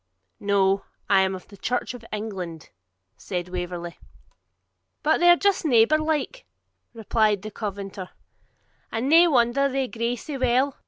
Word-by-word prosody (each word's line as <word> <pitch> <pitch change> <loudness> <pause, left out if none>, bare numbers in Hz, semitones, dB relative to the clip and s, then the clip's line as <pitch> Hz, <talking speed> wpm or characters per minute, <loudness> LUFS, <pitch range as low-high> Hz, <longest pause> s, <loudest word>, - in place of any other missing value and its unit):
'No; 195 -1 +2 0.3
I 195 -1 +6
am 190 0 0
of 185 - -11
the 200 - -15
Church 245 +5 -2
of 245 -2 -10
England,' 190 -7 -6 0.5
said 180 -2 -5
Waverley. 175 -1 -5 1.1
'And 315 - +3
they're 350 0 +7
just 400 +2 +1
neighbour 270 +1 +4
like,' 310 - -2 0.4
replied 215 -3 0
the 215 - -6
Covenanter; 200 -2 -6 0.8
'and 225 +4 -2
nae 335 +4 +7
wonder 270 -1 +2
they 265 -1 -1
gree 235 0 -2
sae 280 +3 -7
weel. 255 +2 +2
225 Hz, 140 wpm, -24 LUFS, 195-275 Hz, 1.1 s, they're